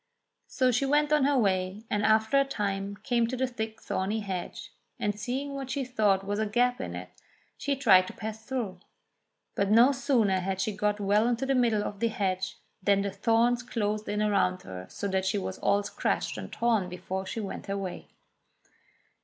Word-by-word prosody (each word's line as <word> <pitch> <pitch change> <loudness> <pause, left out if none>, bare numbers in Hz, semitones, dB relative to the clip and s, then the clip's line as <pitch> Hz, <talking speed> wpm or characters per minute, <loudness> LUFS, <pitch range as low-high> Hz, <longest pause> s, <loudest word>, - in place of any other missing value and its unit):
So 255 -1 +2
she 250 +3 +1
went 295 +1 +3
on 295 -3 +4
her 285 -1 +3
way, 190 -2 0
and 205 -1 -1
after 220 +5 +4
a - - +5
time 200 -6 -3
came 235 -2 +2
to 255 +2 -3
the 260 - +1
thick 220 -3 -5
thorny 205 +4 -2
hedge, 190 -3 -5 0.3
and 205 - 0
seeing 255 +8 -4
what 270 -2 -5
she 270 0 -2
thought 210 -6 +2
was 205 +1 -2
a 220 - +1
gap 245 +4 +1
in - - -5
it, - - -7 0.5
she 285 -1 -1
tried 195 -9 +5
to - - -7
pass 220 0 -6
through; 220 -7 -3 0.7
but 200 0 0
no 235 +5 +7
sooner 240 -8 +2
had 190 +1 -2
she 205 +1 -1
got 210 0 0
well 205 +3 +3
into 245 +2 0
the 270 - +1
middle 235 -5 +2
of 205 -1 -5
the 230 - +2
hedge 190 -4 -2 0.2
than 200 +1 +3
the 200 - -2
thorns 230 +4 +2
closed 215 -3 -2
in 210 +1 0
around 190 -3 +1
her 90 -1 -8
so 200 - -4
that 190 -1 0
she 200 +2 +1
was 190 -1 -4
all 205 0 +2
scratched - - -1
and - - -7
torn 225 -6 +1
before 185 +1 -5
she 225 - -4
went 205 -3 -6
her 200 0 -2
way. 190 -2 -5
210 Hz, 200 wpm, -28 LUFS, 195-245 Hz, 0.7 s, no